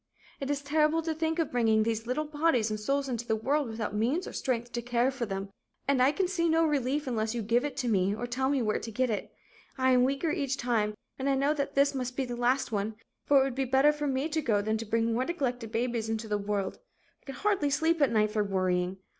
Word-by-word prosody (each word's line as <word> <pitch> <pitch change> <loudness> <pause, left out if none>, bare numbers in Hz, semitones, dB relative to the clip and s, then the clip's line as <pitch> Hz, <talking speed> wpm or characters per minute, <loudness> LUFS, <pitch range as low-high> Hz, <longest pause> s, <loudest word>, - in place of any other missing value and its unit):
"It 275 - -4
is 285 -1 -1
terrible 305 +2 +2
to 320 0 -1
think 320 +1 -1
of 325 -4 0
bringing 225 -3 +3
these 225 0 -2
little 300 +5 -1
bodies 295 -7 +1
and 215 - -2
souls 275 +6 0
into 240 -2 -3
the 220 - +2
world 275 +6 0
without 220 -2 -4
means 250 - 0
or - - -8
strength 240 -2 -2
to 240 - -3
care 245 +2 +1
for 255 -3 -4
them. 195 0 -4 0.4
And 275 -2 +3
I 260 +2 +5
can 380 +4 0
see 340 -3 0
no 325 +1 +4
relief 290 -1 0
unless 225 -3 -1
you 235 - -2
give 235 +4 +2
it 290 - -4
to 250 - -1
me 200 -2 +2
or 240 - -4
tell 260 +2 -1
me 275 -3 +1
where 215 -1 0
to 225 - -7
get 255 +2 0
it. 210 - -3 0.5
I 260 0 +3
am 250 -1 +5
weaker 275 +5 0
each 280 -5 -1
time 215 -4 0 0.2
and 270 +1 0
I 275 - +3
know 280 +3 +2
that 285 -2 -3
this 280 +1 +4
must 255 -1 -4
be 270 - 0
the 245 -1 -5
last 245 +2 +1
one, 210 +1 -2 0.3
for 285 -1 +6
it - - +4
would 270 -1 -2
be 270 +2 -1
better 265 +3 +4
for 295 0 -3
me 270 +2 0
to 315 0 0
go, 220 -7 +2
than 215 +2 -1
to 230 - -4
bring 230 +1 +1
more 245 +3 +1
neglected 250 -9 -2
babies 235 -1 -1
into 225 0 -2
the 210 -1 -1
world. 200 -1 -2 0.4
I - - -34
can 270 - -6
hardly 395 -4 +1
sleep 320 +3 +1
at 280 - +4
night 215 -1 +2
for 210 -1 +1
worrying. 185 -2 0
250 Hz, 260 wpm, -29 LUFS, 220-285 Hz, 0.5 s, for